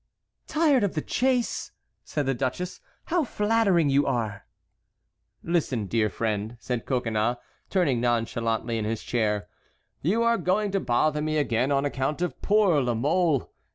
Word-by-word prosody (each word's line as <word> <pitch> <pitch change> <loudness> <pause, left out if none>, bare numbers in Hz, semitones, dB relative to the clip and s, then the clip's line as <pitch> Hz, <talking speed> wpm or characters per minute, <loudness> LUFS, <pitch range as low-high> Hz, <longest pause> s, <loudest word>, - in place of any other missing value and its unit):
"Tired 300 -6 +3
of 200 - -1
the 155 - 0
chase!" 255 -2 0 0.3
said 145 -2 -2
the 135 - +1
duchess. 135 +8 -3 0.2
"How 345 -1 +1
flattering 210 - +2
you 140 +1 +3
are!" 110 -6 -2 1.0
"Listen, 150 -10 0
dear 110 +1 +1
friend," 110 +2 -2
said 125 -2 -4
Coconnas, 120 -2 0 0.3
turning 145 -11 +1
nonchalantly 115 -1 0
in 105 - -2
his 110 0 -3
chair. 105 -4 0 0.5
"You 210 +10 +2
are 235 0 +3
going 200 +3 +1
to 195 - +1
bother 150 +3 +1
me 155 0 0
again 130 -2 +1
on 140 0 +2
account 145 +4 -1
of 180 - -4
poor 200 -8 +3
La 120 -2 0
Mole. 150 +3 +1
140 Hz, 150 wpm, -26 LUFS, 115-185 Hz, 1.0 s, Tired